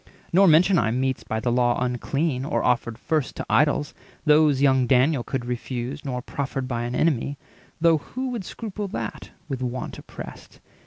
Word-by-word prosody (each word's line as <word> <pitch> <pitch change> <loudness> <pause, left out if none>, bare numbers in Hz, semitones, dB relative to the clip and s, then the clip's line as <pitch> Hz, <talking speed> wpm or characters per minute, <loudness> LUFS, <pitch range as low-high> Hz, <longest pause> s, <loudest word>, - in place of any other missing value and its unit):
Nor 195 +2 +6
mention 170 +3 +5
I 110 - +1
Meats 130 +2 -1
by 110 - -2
the 120 +2 0
law 120 0 +2
unclean, 130 +3 -1
or 140 - -1
offered 120 -2 +1
first 155 -4 -1
To - - -5
idols—those 150 0 +2
young 130 -3 +4
Daniel 130 +2 +3
could 130 -1 -3
refuse; 125 +3 -4
Nor 125 -3 -3
proffered 135 -2 -3
by 120 -2 -2
an 120 +1 -3
enemy—though 155 +3 0
who 255 - -8
330 - - -4
Would 235 -5 -3
scruple 210 +1 -5
that, - - -5 0.2
with 135 -4 -4
want 125 0 -4
oppressed? - - -10
135 Hz, 165 wpm, -24 LUFS, 125-155 Hz, 0.2 s, Nor